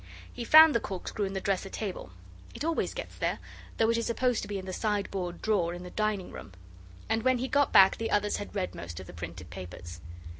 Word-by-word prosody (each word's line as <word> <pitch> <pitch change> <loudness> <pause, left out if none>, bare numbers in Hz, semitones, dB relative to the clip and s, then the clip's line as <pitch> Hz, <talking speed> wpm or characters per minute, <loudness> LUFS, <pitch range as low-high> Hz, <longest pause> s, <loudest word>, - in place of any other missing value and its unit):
He 240 - -5
found 315 +5 +9
the 235 - +3
corkscrew 200 +1 -4
in 195 - -4
the 195 - -2
dresser 195 0 -1
drawer 195 - -5 0.5
it - - -5
always 330 +6 -1
gets - - -6
there, - - -1 0.4
though 225 0 +3
it 230 - +1
is 230 - -2
supposed 245 0 +1
to - - -6
be 205 - -3
in 190 - -6
the 185 - -5
sideboard 195 -4 -2
drawer 180 -6 +1
in 175 - -8
the 180 - -9
dining 215 -3 -1
room 100 - -10 0.5
and 225 0 +1
when 255 +2 +3
he 255 +2 -2
got 285 +1 +2
back 190 0 +7
the 225 0 -2
others 205 0 +1
had 205 - -8
read 185 -2 -2
most 85 -1 -7
of 95 - -8
the - - -11
printed 85 0 -8
papers. 85 -1 -9
200 Hz, 230 wpm, -29 LUFS, 175-225 Hz, 0.5 s, found